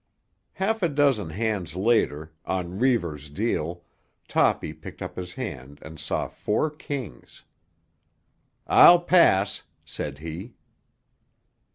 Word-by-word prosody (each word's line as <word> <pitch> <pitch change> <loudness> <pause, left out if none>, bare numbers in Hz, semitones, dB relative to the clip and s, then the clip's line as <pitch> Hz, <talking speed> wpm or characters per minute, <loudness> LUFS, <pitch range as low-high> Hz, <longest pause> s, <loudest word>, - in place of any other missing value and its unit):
Half 220 +3 -1
a 175 - +2
dozen 140 - +2
hands 95 -3 -2
later, 90 -7 +1
on 90 +1 -3
Reivers' 85 - 0
deal, 85 -1 -2 0.4
Toppy 75 - +1
picked 80 0 -11
up - - -6
his 90 +2 -6
hand 70 - -6
and 80 0 -10
saw 75 - -2
four 110 +9 -1
kings. 140 - -7 1.2
"I'll 175 0 +8
pass," 165 - +4 0.2
said 70 -2 -5
he. 85 +9 -8
95 Hz, 105 wpm, -25 LUFS, 80-130 Hz, 1.2 s, I'll